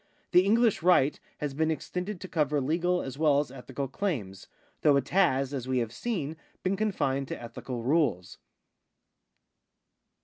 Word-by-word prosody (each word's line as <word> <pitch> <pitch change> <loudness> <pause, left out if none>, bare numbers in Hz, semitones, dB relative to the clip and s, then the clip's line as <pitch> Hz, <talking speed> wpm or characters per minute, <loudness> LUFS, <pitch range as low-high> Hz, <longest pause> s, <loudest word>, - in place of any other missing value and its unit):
The 180 0 +6
English 225 +1 +3
right 165 -5 +4 0.2
has 145 -2 -3
been 160 +3 +1
extended 180 +4 -3
to 185 - -6
cover 150 -4 +1
legal 175 +6 +1
as 135 +1 -7
well 150 -3 +4
as 145 - -2
ethical 135 +1 -5
claims, 125 - -3 0.3
though 145 -2 +5
it 135 -1 -2
has, 145 -8 +2
as 130 -2 -4
we 130 0 0
have 115 -2 -1
seen, 160 - -3 0.3
been 190 +1 +1
confined 140 -10 0
to - - -5
ethical 120 +1 -6
rules. 130 - 0
150 Hz, 150 wpm, -29 LUFS, 130-180 Hz, 0.3 s, The